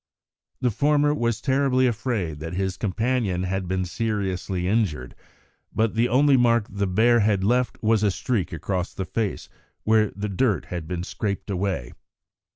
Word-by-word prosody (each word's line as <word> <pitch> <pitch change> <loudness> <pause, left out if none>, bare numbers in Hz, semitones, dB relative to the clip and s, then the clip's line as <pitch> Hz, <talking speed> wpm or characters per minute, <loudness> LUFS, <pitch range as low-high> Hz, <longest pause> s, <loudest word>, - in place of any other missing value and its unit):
The 125 -2 +2
former 145 +4 +2
was 120 -6 0
terribly 130 -1 +2
afraid 110 - -1
that 80 +2 -6
his 95 -1 -1
companion 110 -2 -1
had 95 0 -2
been 95 0 -1
seriously 95 -3 -2
injured, 95 - 0 0.6
but 110 -1 +1
the 115 +2 +2
only 140 +3 +4
mark 115 -3 +3
the 100 0 -2
bear 115 +6 +4
had 100 -3 +2
left 125 +4 +1
was 110 -1 +3
a 105 - +3
streak 100 -2 -1
across 90 +2 -3
the 95 - -3
face 105 +2 -3 0.4
where 110 -1 +3
the 100 +2 -3
dirt 100 +1 +1
had 85 -3 -6
been 90 -1 -3
scraped 100 +1 -4
away. 90 -10 -2
105 Hz, 160 wpm, -24 LUFS, 95-120 Hz, 0.6 s, only